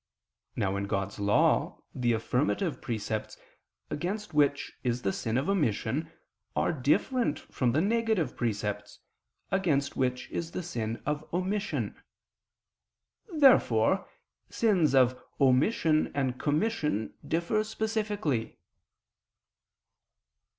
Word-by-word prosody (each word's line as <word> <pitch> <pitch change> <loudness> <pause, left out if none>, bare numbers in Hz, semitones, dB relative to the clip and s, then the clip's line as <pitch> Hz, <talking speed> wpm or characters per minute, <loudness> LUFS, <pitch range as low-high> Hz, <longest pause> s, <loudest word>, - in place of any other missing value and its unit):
Now 95 +1 0
in 100 - -2
God's 100 0 -3
law, 100 0 +2
the 120 -2 +1
affirmative 140 - 0
precepts, 110 -2 -3 0.5
against 190 +4 -3
which 145 -1 +2
is 125 -1 -1
the 95 - 0
sin 115 +1 -1
of 135 - 0
omission, 155 - 0 0.4
are - - +1
different 155 - +1
from 125 -3 -1
the 155 - +3
negative 220 - +1
precepts, 105 -3 -3 0.5
against 165 -8 +1
which 125 -1 -1
is 170 0 -4
the 185 - -3
sin 115 -9 -4
of 150 +1 -1
omission. 190 +4 -2 1.3
Therefore 195 - +4 0.4
sins 180 - +2
of 125 -1 +4 0.2
omission 155 - +3
and 130 -3 -1
commission 150 - 0
differ 170 +6 0
specifically. 210 - -2
145 Hz, 100 wpm, -29 LUFS, 120-190 Hz, 1.3 s, Therefore